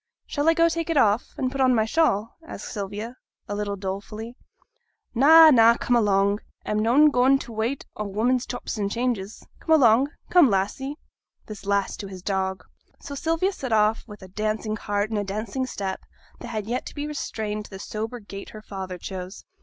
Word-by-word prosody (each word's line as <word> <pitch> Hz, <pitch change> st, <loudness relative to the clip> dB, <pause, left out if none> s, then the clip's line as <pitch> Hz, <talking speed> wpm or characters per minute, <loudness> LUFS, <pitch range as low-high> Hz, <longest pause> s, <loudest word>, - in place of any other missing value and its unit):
'Shall 290 Hz, +2 st, +1 dB
I 330 Hz, -, +4 dB
go 335 Hz, 0 st, +5 dB
take 335 Hz, 0 st, -2 dB
it 330 Hz, -, +1 dB
off, 220 Hz, -3 st, +2 dB
and 255 Hz, -1 st, -1 dB
put 275 Hz, 0 st, -2 dB
on 255 Hz, -1 st, +4 dB
my 220 Hz, -1 st, +2 dB
shawl?' 225 Hz, -5 st, +1 dB
asked 325 Hz, -, -8 dB
Sylvia, 210 Hz, +3 st, -5 dB, 0.3 s
a -, -, -4 dB
little 205 Hz, 0 st, -2 dB
dolefully. 205 Hz, +4 st, -6 dB, 0.8 s
'Na, 315 Hz, +5 st, +8 dB
na, 230 Hz, -3 st, +6 dB
come 245 Hz, -, +1 dB
along! 200 Hz, -2 st, +2 dB, 0.3 s
a'm 210 Hz, -, 0 dB
noane 265 Hz, +8 st, +5 dB
goin' 260 Hz, +1 st, +4 dB
for -, -, -8 dB
t' -, -, -11 dB
wait 225 Hz, +5 st, -2 dB
o' 210 Hz, -, -4 dB
women's 240 Hz, +5 st, 0 dB
chops 245 Hz, -3 st, -5 dB
and 200 Hz, -1 st, -1 dB
changes. 230 Hz, -4 st, -3 dB
Come 320 Hz, -, +3 dB
along; 255 Hz, -2 st, +5 dB, 0.2 s
come, 350 Hz, -7 st, +7 dB
Lassie!' 215 Hz, +9 st, -1 dB, 0.5 s
(this 210 Hz, -2 st, -10 dB
last 200 Hz, -1 st, 0 dB
to 200 Hz, -, -5 dB
his 185 Hz, -2 st, -10 dB
dog). 190 Hz, -1 st, -2 dB, 0.4 s
So 285 Hz, -, -8 dB
Sylvia 330 Hz, +6 st, 0 dB
set 270 Hz, -10 st, -6 dB
off 215 Hz, +1 st, +3 dB
with 210 Hz, -3 st, -11 dB
a -, -, -10 dB
dancing 215 Hz, +2 st, -2 dB
heart 205 Hz, 0 st, -2 dB
and 215 Hz, -, 0 dB
a -, -, -1 dB
dancing 215 Hz, +6 st, -3 dB
step, 195 Hz, -5 st, -4 dB, 0.4 s
that -, -, -8 dB
had 220 Hz, +3 st, -3 dB
to -, -, -10 dB
be 290 Hz, 0 st, -3 dB
restrained 215 Hz, -8 st, -4 dB
to -, -, -13 dB
the 195 Hz, -, -8 dB
sober 220 Hz, +4 st, -5 dB
gait 200 Hz, -2 st, -9 dB
her 215 Hz, -1 st, -11 dB
father 190 Hz, -3 st, -6 dB
chose. 185 Hz, +1 st, -7 dB
220 Hz, 195 wpm, -24 LUFS, 200-260 Hz, 0.8 s, Na